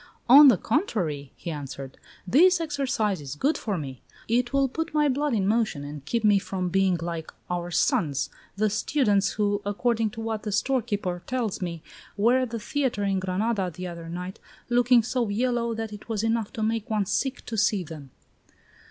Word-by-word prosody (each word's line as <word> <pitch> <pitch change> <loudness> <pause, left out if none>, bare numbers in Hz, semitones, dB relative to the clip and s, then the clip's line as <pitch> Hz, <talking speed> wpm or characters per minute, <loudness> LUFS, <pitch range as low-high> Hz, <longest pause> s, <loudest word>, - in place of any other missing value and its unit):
"On 280 +4 +10
the 245 -8 +6
contrary," 175 - -1
he 170 - -6
answered, 135 -3 -7 0.3
"this 345 - +5
exercise 270 - -1
is 140 0 -6
good 285 - +1
for 205 -4 -2
me; 135 -5 -6 0.3
it 240 +2 +1
will 275 -1 +3
put 315 +4 -4
my 300 -1 +4
blood 285 -1 0
in 195 -3 +1
motion 215 -9 +1
and 145 -1 -7
keep 230 +7 -1
me 205 -2 +5
from 185 -2 -3
being 190 -1 +2
like 165 -1 -5 0.2
our 175 0 -2
sons, 170 - +1 0.2
the 210 +1 +1
students 210 -3 +1
who, 205 -1 0
according 225 +2 0
to 220 - -10
what 225 -1 -3
the 210 - -4
storekeeper 205 -6 -1
tells 245 -7 -2
me, 170 -3 -4 0.3
were 235 +5 +4
at 255 -2 -1
the 230 0 -4
theatre 260 -3 -1
in 195 -1 +1
Granada 190 +1 -1
the 180 +2 -7
other 170 -2 -7
night 180 +2 -6 0.3
looking 245 -1 +4
so 240 -1 -1
yellow 235 +1 0
that 225 -1 -4
it 210 +2 -11
was 220 -1 -1
enough 225 -2 0
to 225 -4 -3
make 225 +1 -1
one 215 -2 +1
sick 265 +7 -2
to 230 - -5
see 210 -2 +2
them." 155 -4 -10
210 Hz, 185 wpm, -26 LUFS, 180-240 Hz, 0.3 s, On